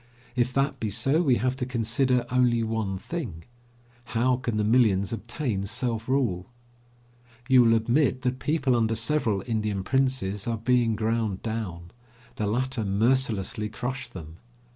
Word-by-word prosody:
If 125 0 +1
that 135 +2 0
be 110 - -2
so, 135 - +2
we 135 -7 +3
have 125 +3 0
to 130 - -2
consider 125 +1 +1
only 125 -2 +3
one 110 -4 -2
thing: 95 - -6 0.7
how 125 +2 +3
can 120 -4 -2
the 105 - +1
millions 105 -3 +3
obtain 115 -3 -3
self 115 0 -2
rule? 115 -10 0 1.0
You 130 -2 +6
will 115 -1 +5
admit 125 +3 +1
that 125 0 -1
people 135 -5 +1
under 115 -1 +1
several 115 -4 0
Indian 105 -4 -1
princes 130 -6 0
are 115 -1 -1
being 120 0 +2
ground 110 -2 -1
down. 95 -7 -4 0.5
The 105 - -1
latter 125 +2 -1
mercilessly 105 0 0
crush 130 +4 -4
them. 80 -2 -10
115 Hz, 145 wpm, -26 LUFS, 105-130 Hz, 1.0 s, You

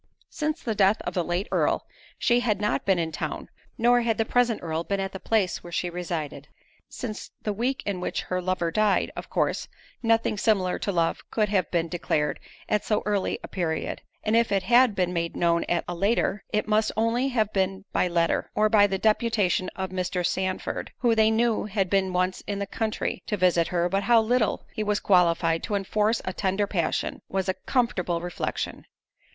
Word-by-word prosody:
Since 305 0 -2
the 225 - -1
death 200 +1 +3
of - - -4
the 180 - 0
late 175 +4 -2
Earl, - - +1 0.3
she 240 0 +3
had 220 -5 0
not 210 0 0
been 190 -2 +4
in 165 -1 -1
town; 155 - -4 0.3
nor 240 +1 +4
had 230 -2 0
the 225 - +1
present 245 -1 +2
Earl 165 0 -2
been 200 +3 -1
near 195 0 -1
the 190 0 -8
place 200 -5 0
where 175 - -10
she 175 +1 -1
resided, 170 -4 -4 0.4
since 225 -5 -6
the 210 - -1
week 245 +6 -1
in 195 -3 -2
which - - -2
her 185 0 -2
lover 180 -2 -1
died; 215 +2 +2
of - - -7
course, - - 0 0.3
nothing 225 -2 +2
similar 195 -5 +1
to 200 - -1
love 170 -3 0
could 215 -2 +1
have 190 -5 +1
been 170 -1 0
declared 155 -3 -1 0.3
at 210 - +1
so 210 -1 0
early 205 -2 0
a - - -6
period; 160 -4 -2 0.2
and 215 +1 +1
if 235 -1 +3
it 195 -1 +2
had 240 +2 +5
been 180 -2 0
made 170 -1 -2
known 170 -1 +2
at 175 - 0
a 175 - -3
later, 195 +2 0
it 210 0 -1
must 215 0 +2
only 230 +4 +2
have 220 -5 0
been 190 0 -1
by - - +2
letter, 170 -1 +1
or 215 0 +3
by 205 -1 +6
the 195 -1 -1
deputation 210 -3 +1
of 190 -1 -4
Mr. 180 -1 -1
Sandford, 185 +1 -2
who 240 -2 +2
they 220 -1 +4
knew 225 0 +1
had 195 -3 -1
been 195 -1 +2
once 185 +1 0
in 205 - -2
the 200 - -2
country 215 +2 -2
to 210 - -1
visit 175 -2 +3
her; 175 -1 +1
but 195 +2 0
how 230 +3 +5
little 225 0 +1
he - - -3
was 210 -1 0
qualified 170 -3 +3
to 210 - -2
enforce 210 +3 0
a 185 - -2
tender 195 +1 0
passion, 180 -5 -1
was 190 0 -1
a 185 - +2
comfortable 190 -9 0
reflection. 175 0 -4
195 Hz, 200 wpm, -26 LUFS, 180-220 Hz, 0.4 s, by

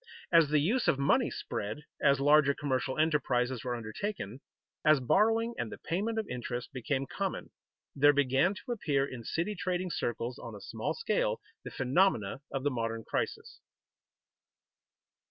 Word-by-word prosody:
As 165 -3 +6
the 150 - +3
use 215 - +1
of - - +4
money 140 0 +3
spread, 110 +9 -5 0.2
as 140 -2 +4
larger 145 0 +5
commercial 130 -2 -1
enterprises 130 -6 +1
were 125 -1 -2
undertaken, 120 - -5 0.4
as 155 -2 +5
borrowing 225 - +2
and 115 - -3
the - - -7
payment 210 +7 -2
of 220 - -1
interest 125 0 -5
became 135 +2 -1
common, - - -4 0.4
there 145 +1 +6
began 145 +6 +2
to 245 - -7
appear 145 -12 +1
in 130 -4 -8
city 170 - -1
trading 180 -1 -2
circles, 120 -1 -3
on - - -8
a - - -9
small - - -3
scale, - - 0 0.2
the - - -6
phenomena 130 - +1
of 135 -1 -3
the 145 - +1
modern 115 -2 -2
crisis. - - -3
140 Hz, 155 wpm, -31 LUFS, 125-180 Hz, 0.4 s, As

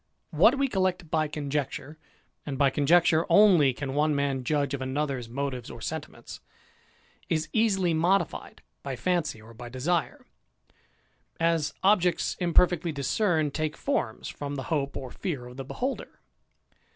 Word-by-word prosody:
What 205 - +5
we 275 0 +2
collect 185 - -1
by 155 -1 +2
conjecture, 145 0 -4 0.4
and 140 -2 -5
by 140 -1 +3
conjecture 160 +3 +4
only 180 -10 +6
can 135 +1 -5
one 150 +1 +2
man 140 -2 -1
judge 145 0 0
of 140 - -3
another's 130 -2 -2
motives 130 -1 -4
or 120 - -9
sentiments, 155 +7 -7 0.9
is 155 -1 0
easily 195 -6 +2
modified 175 +5 0 0.2
by - - -4
fancy 175 -9 -1
or 110 +2 -14
by 120 +1 -9
desire; 150 +7 -2 1.1
as 165 -2 +1
objects 185 -3 +2
imperfectly 175 -1 +3
discerned 155 - 0
take 155 -1 -2
forms 275 - -2
from 145 0 -5
the 135 - -4
hope 140 -2 -1
ot 130 -2 -7
fear 150 -11 -4
of 125 +1 -11
the 135 - -6
beholder. 260 - -4
150 Hz, 140 wpm, -27 LUFS, 135-175 Hz, 1.1 s, only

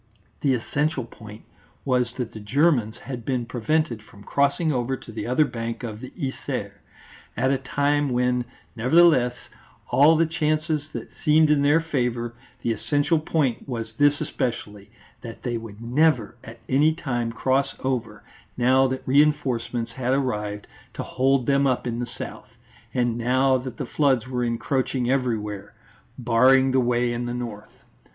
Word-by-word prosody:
The 135 -3 +3
essential 145 +2 -1
point 105 -2 -12 0.4
was 125 -3 +1
that 125 -4 -4
the 110 - -8
Germans 120 0 +1
had 125 -2 -7
been 125 -1 -1
prevented 120 +1 -1
from 100 -1 -16
crossing 140 - +1
over 130 +1 -1
to 115 - -12
the 115 - -5
other 130 +5 +3
bank 115 -2 -5
of 110 -3 -5
the 130 +1 -8
Yser, 130 - -4 0.7
at 130 - +2
a 135 - +1
time 145 +2 0
when, 125 0 +1 0.3
nevertheless, 125 0 +4 0.6
all 150 +4 +6
the 165 +1 +3
chances 155 -1 -1
had - - -6
seemed 155 0 +5
in 145 -2 +3
their 145 +3 +4
favour; 125 -7 -2 0.3
the 120 - +1
essential 145 +7 +1
point 145 -5 -1
was 115 -3 -4
this 145 0 +4
especially, 105 -8 -4 0.3
that 115 -2 -9
they 120 -2 -2
would 115 -2 -7
never 125 -3 +2
at 115 -1 -10
any 150 +4 +3
time 120 -7 -2
cross 130 +3 0
over, 115 -5 -2 0.3
now 130 +2 +4
that 130 0 -5
reinforcements 130 -5 +1
had 130 +2 0
arrived 105 -6 -2 0.3
to - - -4
hold 130 0 +1
them 140 +1 +3
up 130 -1 0
in 120 -1 -2
the 120 - -3
south, - - -8 0.4
and 120 -2 0
now 130 +3 +3
that 130 -1 -4
the - - -3
floods 135 -6 +1
were 125 -1 -2
encroaching 125 +1 -1
everywhere, 110 -6 -2 0.4
barring 130 +2 +4
the 130 - +3
way 120 -1 +1
in 120 +1 -3
the 120 - -3
north. 110 -4 -8
125 Hz, 160 wpm, -24 LUFS, 115-140 Hz, 0.7 s, all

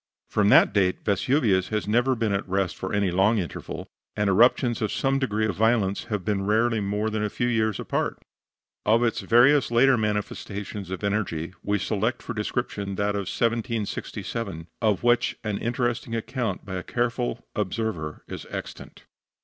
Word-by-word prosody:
From 105 -1 +3
that - - +6
date 95 -3 +1
Vesuvius 105 -2 +2
has 105 -2 -2
never 120 +5 +2
been 110 -3 0
at 100 -1 -2
rest 95 -1 0
for 95 - -5
any 100 -3 +1
long 100 +5 +3
interval, 90 -5 -5 0.3
and 105 -1 +1
eruptions 120 +3 +4
of 110 - 0
some 135 0 +1
degree 110 -5 0
of 100 -5 -1
violence 110 -2 +2
have 105 -5 -3
been 100 -2 0
rarely 115 +2 +2
more 105 +2 -1
than 105 0 -1
a 105 - 0
few 120 - -1
years 110 -4 +1
apart. - - -1 0.7
Of 115 +3 +3
its 115 - +1
various 130 +4 +5
later 125 +2 +5
manifestations 105 -2 -3
of 95 +1 -5
energy 95 -5 -1
we 105 0 0
select 110 +4 -1
for 120 - -4
description 105 -2 -3
that 100 +1 0
of 100 -2 -3
1767, 115 -5 -2 0.2
of 105 -4 +1
which 120 0 +2
an 105 -2 -2
interesting 120 -1 -1
account 115 -3 -3
by 95 -2 -4
a 90 - -4
careful 120 0 -2
observer 105 -7 -3
is - - -7
extant. - - -8
105 Hz, 165 wpm, -25 LUFS, 100-120 Hz, 0.7 s, that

